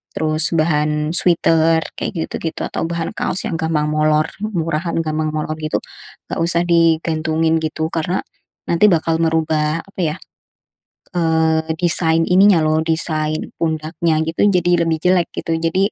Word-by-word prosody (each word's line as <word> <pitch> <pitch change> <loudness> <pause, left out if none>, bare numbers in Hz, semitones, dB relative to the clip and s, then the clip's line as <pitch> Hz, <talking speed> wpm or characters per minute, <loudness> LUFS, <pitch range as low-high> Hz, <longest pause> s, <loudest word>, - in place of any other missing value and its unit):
terus 155 0 +3
bahan 150 -1 +1
sweater 165 -2 +3 0.2
kayak - - -3 0.2
gitu-gitu, 165 - -4
atau - - -4
bahan 170 -1 -3
kaos 185 - 0
yang - - -3
gampang 160 -2 0
molor, 155 0 +2 0.2
murahan, 170 -5 -2
gampang 155 0 -2
molor, 155 0 -3
gitu, 155 0 -2 0.5
enggak - - -3
usah 170 +1 +2
digantungin, 160 -1 +2
gitu, 160 0 -2
karena 170 +3 -1 0.5
nanti 170 +5 +4
bakal 165 -1 +1
merubah 160 -1 0
apa, 195 - -16
ya, 160 -1 -1 1.0
eee, 160 -1 +1
desain 165 -2 +1
ininya, 190 0 +5
loh, 155 0 +1
desain 155 -1 -1 0.2
pundaknya, 160 0 -1
gitu, 165 - -2
jadi 175 -2 +2
lebih 160 -1 +1
jelek, 180 -1 +3
gitu, 165 - -2
jadi 185 +5 0
160 Hz, 140 wpm, -18 LUFS, 155-170 Hz, 1.0 s, ininya